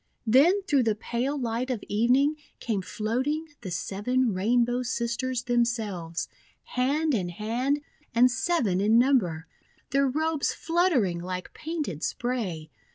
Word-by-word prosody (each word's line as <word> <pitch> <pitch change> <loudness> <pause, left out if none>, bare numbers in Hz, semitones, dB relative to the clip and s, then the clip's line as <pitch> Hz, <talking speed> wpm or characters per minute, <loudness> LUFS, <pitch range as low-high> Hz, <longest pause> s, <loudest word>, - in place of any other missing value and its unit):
Then 305 - +5
through 285 -8 +2
the 225 -3 +1
pale 245 +6 -2
light 240 0 -2
of 245 -5 -2
evening 250 +8 +3 0.2
came 215 -5 -1
floating 260 - -2
the 195 - -6
Seven 210 +7 0
Rainbow 240 +5 +2
Sisters 240 0 -2
themselves, 225 -9 -1 0.4
hand 290 +5 0
in 185 -7 0
hand 240 +10 -1 0.3
and 250 +2 +6
seven 245 - +1
in 215 +3 +4
number, 220 - +2 0.5
their 275 +1 +3
robes 310 +2 0
fluttering 320 - +1
like 180 +1 -5
painted 300 - -4
spray. 195 -11 -3
240 Hz, 125 wpm, -27 LUFS, 210-275 Hz, 0.5 s, and